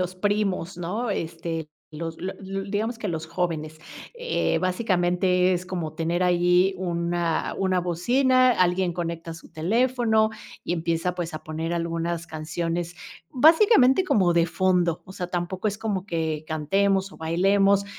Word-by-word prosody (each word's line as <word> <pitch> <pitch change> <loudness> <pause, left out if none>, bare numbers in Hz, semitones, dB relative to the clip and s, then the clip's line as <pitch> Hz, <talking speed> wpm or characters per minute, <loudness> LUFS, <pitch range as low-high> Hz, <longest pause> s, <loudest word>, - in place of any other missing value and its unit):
los 180 0 -2
primos, 195 -2 -1
¿no?, 210 +7 -2
este, 165 -3 -4 0.2
los 165 +1 -5
la 185 +2 -4
los 195 0 -5
digamos 220 +3 -2
que 215 - -3
los 160 -2 -3
jóvenes, 160 -2 -3 0.3
eh, 480 - 0
básicamente 180 -1 +1
es 180 0 -2
como 170 -4 -4
tener 170 +2 -1
allí 180 +1 +3
una, 170 -2 -1
una 185 -1 +1
bocina, 255 +9 +3
alguien 180 -3 +2
conecta 165 -1 -4
su 165 - -14
teléfono 220 +4 +2 0.3
y - - -2
empieza 170 +1 -1
pues 170 -2 -4
a 155 - -6
poner 160 +2 -4
algunas 170 0 -2
canciones 165 +2 -3 0.4
básicamente 320 - +5
como 190 - +3
de 170 -1 +3
fondo, 175 -1 +1
o 190 - -11
sea, 180 -2 -4
tampoco 180 +3 -3
es 205 +1 -4
como 205 -4 -2
que 160 -3 -2
cantemos 195 +5 +1
o - - -13
bailemos, 195 +4 +2
180 Hz, 145 wpm, -25 LUFS, 165-195 Hz, 0.4 s, básicamente